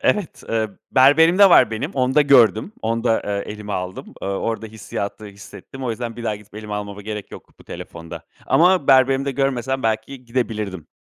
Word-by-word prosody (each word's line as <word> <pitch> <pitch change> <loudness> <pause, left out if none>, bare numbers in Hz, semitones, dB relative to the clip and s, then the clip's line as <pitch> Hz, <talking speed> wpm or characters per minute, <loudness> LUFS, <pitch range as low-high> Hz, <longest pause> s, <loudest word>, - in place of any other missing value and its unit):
Evet. 205 -6 0
Eee, 110 -1 0 0.2
berberimde 160 +9 +6
var 125 -9 +6
benim, 115 +8 -3
onda 130 +2 +2
gördüm. 125 - +4
Onda, 115 +1 0
eee, 100 0 -3
elime 105 -1 -7
aldım. 90 0 -5
Eee, - - -3
orada 110 +3 -3
hissiyatı 105 -1 -6
hissettim. 100 +6 -11
O 125 - -1
yüzden 115 0 -5
bir 120 - -7
daha 110 -2 -1
gidip 105 0 -19
elime 105 -1 -6
almama 105 0 -6
gerek 105 -1 -6
yok - - -13
bu - - -16
telefonda 85 -1 -9 0.2
ama 180 -2 +3
berberimde 135 +1 +4
görmesem 135 -1 -1
belki 115 +4 -2
gidebilirdim. 110 -8 -3
115 Hz, 170 wpm, -21 LUFS, 105-135 Hz, 0.2 s, berberimde